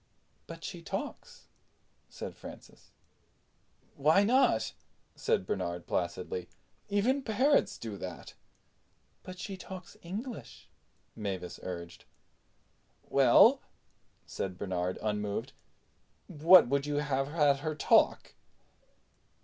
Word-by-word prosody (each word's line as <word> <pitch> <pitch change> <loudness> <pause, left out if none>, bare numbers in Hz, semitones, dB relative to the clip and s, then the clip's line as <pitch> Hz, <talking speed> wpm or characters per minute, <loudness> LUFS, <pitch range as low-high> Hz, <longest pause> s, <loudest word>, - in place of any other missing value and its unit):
"But - - -10
she - - -6
talks," - - -6 0.6
said - - -7
Francis. - - -13 1.1
"Why 155 +8 +4
not?" 215 - +3 0.4
said - - 0
Bernard 85 0 -3
placidly. 90 0 -3 0.4
"Even 230 +8 +2
parrots 260 +5 +2
do 110 -3 -6
that." 90 -2 -8 0.9
"But 185 0 -10
she 195 +1 -6
talks 185 -1 -10
English," 215 +7 -8 0.4
Mavis 95 -5 -5
urged. 85 -2 -7 1.0
"Well," - - +6 0.6
said 90 -2 -5
Bernard, 90 -2 -2
unmoved, 105 -1 -2 0.7
"what 165 +3 +6
would 140 +2 0
you 145 - -1
have 140 -2 0
had 145 -2 +3
her 155 +1 -3
talk?" 150 - +3
140 Hz, 95 wpm, -31 LUFS, -, 1.1 s, Well